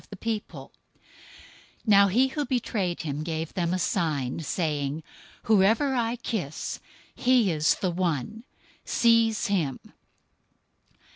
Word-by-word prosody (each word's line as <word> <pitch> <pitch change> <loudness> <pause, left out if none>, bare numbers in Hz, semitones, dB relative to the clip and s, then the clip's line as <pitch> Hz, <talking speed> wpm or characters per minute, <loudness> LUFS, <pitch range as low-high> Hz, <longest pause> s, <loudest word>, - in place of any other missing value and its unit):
026:048 220 +1 -5 1.1
Now 200 -2 +6
he 250 +8 +3
who 295 +2 -2
betrayed 220 -10 -2
him 145 -1 -3
gave 160 0 -4
them 170 -2 -1
a 185 - +1
sign, 155 -8 -1
saying, 150 -2 -2 0.4
"Whoever 220 +7 +3
I 235 -2 0
kiss, 210 - -4 0.3
he 245 -6 +3
is 155 -1 +2
the 185 -4 -1
one. 175 - -2 0.4
Seize 230 -2 +3
him." 170 - 0
190 Hz, 110 wpm, -26 LUFS, 160-230 Hz, 1.1 s, Now